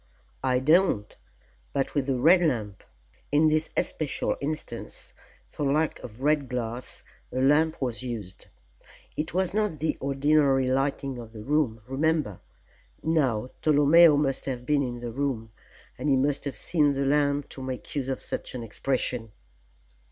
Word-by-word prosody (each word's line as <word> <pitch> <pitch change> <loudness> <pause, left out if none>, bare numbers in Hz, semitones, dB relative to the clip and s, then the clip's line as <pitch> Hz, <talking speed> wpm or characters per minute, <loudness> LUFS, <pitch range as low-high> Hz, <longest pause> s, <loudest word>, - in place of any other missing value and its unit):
"I 130 -1 +2
don't, 150 - +3 0.6
but 135 -1 -1
with 140 -3 0
the 135 - +1
Red 170 +8 +6
Lamp. 110 - -1 0.5
In 155 +2 +5
this 155 +1 +1
especial 155 -3 -1
instance, 155 +2 -5 0.4
for 140 -2 -1
lack 155 +2 +1
of 120 +2 -10
red 150 -2 +2
glass 120 0 -4 0.3
a 130 - -2
lamp 150 +4 +3
was 125 -3 -2
used. 110 -7 -7 0.7
It 155 +2 -3
was 185 0 +1
not 210 -6 0
the 155 +2 -1
ordinary 140 -1 +3
lighting 135 0 -1
of 115 -1 -10
the 105 -1 -8
room, 135 -4 0
remember. 140 - 0 0.6
Now, 130 -8 +1
Tolomeo 150 +1 +6
must 135 -2 0
have 125 -2 -4
been 145 +1 +2
in 120 -3 -4
the 120 -1 -4
room, 120 -4 -2 0.5
and 150 - -1
he 135 - +5
must 140 +2 0
have 140 - -4
seen 150 -4 +2
the 135 0 -1
lamp 145 0 +1
to 135 - -8
make 130 -1 -6
use 135 -3 -1
of 135 - -3
such - - -4
an 120 - -4
expression." 120 0 -2
140 Hz, 155 wpm, -27 LUFS, 125-150 Hz, 0.7 s, Red